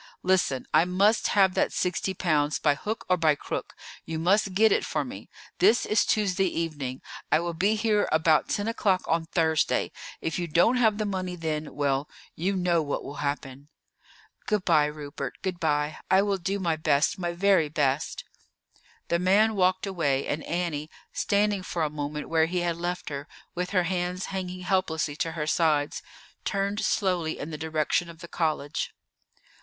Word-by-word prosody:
Listen, 180 Hz, -8 st, +1 dB
I -, -, +6 dB
must 195 Hz, +5 st, +2 dB
have 195 Hz, -2 st, +4 dB
that -, -, +1 dB
sixty 185 Hz, +1 st, -1 dB
pounds 150 Hz, -4 st, +1 dB
by 150 Hz, -, +3 dB
hook 210 Hz, +10 st, -5 dB
or 185 Hz, -, +3 dB
by 160 Hz, -3 st, +3 dB
crook; -, -, -5 dB, 0.3 s
you 160 Hz, -, -4 dB
must 190 Hz, +3 st, +2 dB
get 220 Hz, +2 st, +5 dB
it -, -, +2 dB
for -, -, -2 dB
me. -, -, -9 dB, 0.3 s
This 235 Hz, -, +4 dB
is 215 Hz, -, +3 dB
Tuesday 195 Hz, -3 st, +2 dB
evening. 150 Hz, -7 st, -3 dB, 0.3 s
I 155 Hz, -, +5 dB
will 170 Hz, 0 st, -3 dB
be 195 Hz, +6 st, +2 dB
here 215 Hz, -1 st, +1 dB
about 155 Hz, 0 st, +3 dB
ten 205 Hz, 0 st, -1 dB
o'clock 200 Hz, -5 st, +1 dB
on 165 Hz, 0 st, 0 dB
Thursday; 160 Hz, -2 st, +1 dB, 0.3 s
if 160 Hz, +3 st, -2 dB
you 175 Hz, -, -2 dB
don't 175 Hz, +10 st, +3 dB
have 220 Hz, -4 st, +3 dB
the 215 Hz, -, -1 dB
money 185 Hz, -3 st, -3 dB
then, 155 Hz, -2 st, -4 dB
well, 140 Hz, 0 st, 0 dB, 0.3 s
you 190 Hz, +4 st, -1 dB
know 175 Hz, -2 st, +2 dB
what 145 Hz, -2 st, -3 dB
will 140 Hz, -, -8 dB
happen." 140 Hz, -1 st, -4 dB, 0.8 s
"Good 210 Hz, -3 st, 0 dB
by, 155 Hz, -4 st, +4 dB
Rupert, 145 Hz, -3 st, -5 dB
good 185 Hz, -2 st, -3 dB
by. 150 Hz, -2 st, 0 dB
I 190 Hz, +1 st, +5 dB
will 200 Hz, -1 st, 0 dB
do 195 Hz, +3 st, -1 dB
my 170 Hz, -5 st, 0 dB
best, 150 Hz, +4 st, +2 dB
my 175 Hz, -1 st, -1 dB
very 180 Hz, -3 st, +3 dB
best." 145 Hz, -1 st, -1 dB, 0.9 s
The 170 Hz, -, +2 dB
man 200 Hz, +5 st, +4 dB
walked 185 Hz, 0 st, +2 dB
away, 150 Hz, -8 st, 0 dB
and 150 Hz, +2 st, -2 dB
Annie, 165 Hz, -3 st, -2 dB, 0.2 s
standing 205 Hz, -1 st, +1 dB
for 175 Hz, -2 st, -2 dB
a 150 Hz, -, -1 dB
moment 150 Hz, 0 st, -4 dB
where 160 Hz, -1 st, +3 dB
he 180 Hz, +1 st, -1 dB
had 170 Hz, -1 st, 0 dB
left 175 Hz, 0 st, -3 dB
her, 140 Hz, 0 st, -5 dB, 0.3 s
with 180 Hz, +1 st, -3 dB
her 185 Hz, -3 st, +2 dB
hands 180 Hz, +1 st, -2 dB
hanging 185 Hz, -1 st, -4 dB
helplessly 165 Hz, -6 st, 0 dB
to 165 Hz, -1 st, -2 dB
her 155 Hz, -2 st, -3 dB
sides, 150 Hz, -2 st, +1 dB, 0.4 s
turned 200 Hz, +1 st, -1 dB
slowly 180 Hz, -8 st, 0 dB
in 150 Hz, -, -6 dB
the -, -, -4 dB
direction 160 Hz, +2 st, 0 dB
of 165 Hz, -, -11 dB
the 170 Hz, +1 st, -10 dB
college. 155 Hz, -4 st, -2 dB
170 Hz, 180 wpm, -27 LUFS, 155-190 Hz, 0.9 s, I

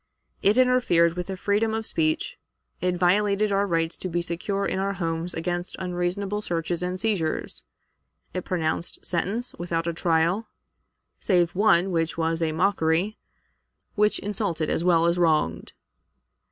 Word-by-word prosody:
It 205 Hz, +4 st, +3 dB
interfered 250 Hz, -10 st, +4 dB
with 180 Hz, 0 st, -4 dB
the 190 Hz, -1 st, -4 dB
freedom 210 Hz, +3 st, +1 dB
of 220 Hz, 0 st, -3 dB
speech; 155 Hz, -5 st, -1 dB, 0.4 s
it 180 Hz, 0 st, +1 dB
violated 200 Hz, +3 st, +2 dB
our 200 Hz, +1 st, +2 dB
rights 165 Hz, -2 st, 0 dB
to 185 Hz, -, -4 dB
be 175 Hz, 0 st, -1 dB
secure 195 Hz, +4 st, -2 dB
in 190 Hz, -, -1 dB
our 195 Hz, +1 st, 0 dB
homes 165 Hz, -1 st, -2 dB
against 175 Hz, +2 st, -3 dB
unreasonable 190 Hz, +3 st, -2 dB
searches 170 Hz, -2 st, -2 dB
and 180 Hz, +1 st, -2 dB
seizures; 190 Hz, -7 st, -1 dB, 0.7 s
it 185 Hz, -, -3 dB
pronounced 165 Hz, -1 st, -2 dB
sentence 200 Hz, +8 st, -1 dB
without 170 Hz, -1 st, -2 dB
a 170 Hz, -, -1 dB
trial, 170 Hz, +6 st, +1 dB, 0.7 s
save 175 Hz, -3 st, +2 dB
one 190 Hz, -2 st, +3 dB
which 165 Hz, -2 st, -1 dB
was 165 Hz, 0 st, 0 dB
a 160 Hz, -1 st, +1 dB
mockery, 175 Hz, +3 st, +1 dB, 0.7 s
which 210 Hz, 0 st, +2 dB
insulted 195 Hz, -6 st, -2 dB
as -, -, 0 dB
well 170 Hz, -2 st, +4 dB
as 170 Hz, +1 st, +2 dB
wronged. 155 Hz, -, +1 dB
180 Hz, 145 wpm, -25 LUFS, 165-200 Hz, 0.7 s, interfered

